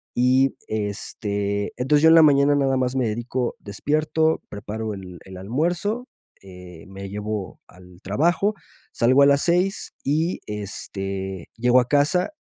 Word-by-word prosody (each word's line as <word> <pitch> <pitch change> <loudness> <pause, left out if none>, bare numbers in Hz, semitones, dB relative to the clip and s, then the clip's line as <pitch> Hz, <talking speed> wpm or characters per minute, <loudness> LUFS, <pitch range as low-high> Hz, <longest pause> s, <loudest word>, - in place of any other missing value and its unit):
Y, 130 +2 +3
este, 100 -1 -3
entonces 145 +4 +2
yo 160 - +8
en 165 - +7
la 165 - +8
mañana 145 -1 +5
nada 135 -2 +1
más 130 0 -1
me 125 -3 +1
dedico 120 +3 -2
despierto, 155 +9 0
preparo 105 +1 -5
el 95 -3 -9
el 95 -1 -10
almuerzo, 175 - -2 0.4
eh, 90 -3 -12
me 95 0 -8
llevo 105 -2 -5
al 90 0 -17
trabajo, 170 - +1 0.4
salgo 130 +4 +3
a - - +7
las 140 0 +4
6 180 +3 0
y, 160 +5 0
este, 95 -3 -5
llego 125 +2 +4
a 125 - 0
casa, 155 - +2
125 Hz, 145 wpm, -23 LUFS, 100-150 Hz, 0.4 s, yo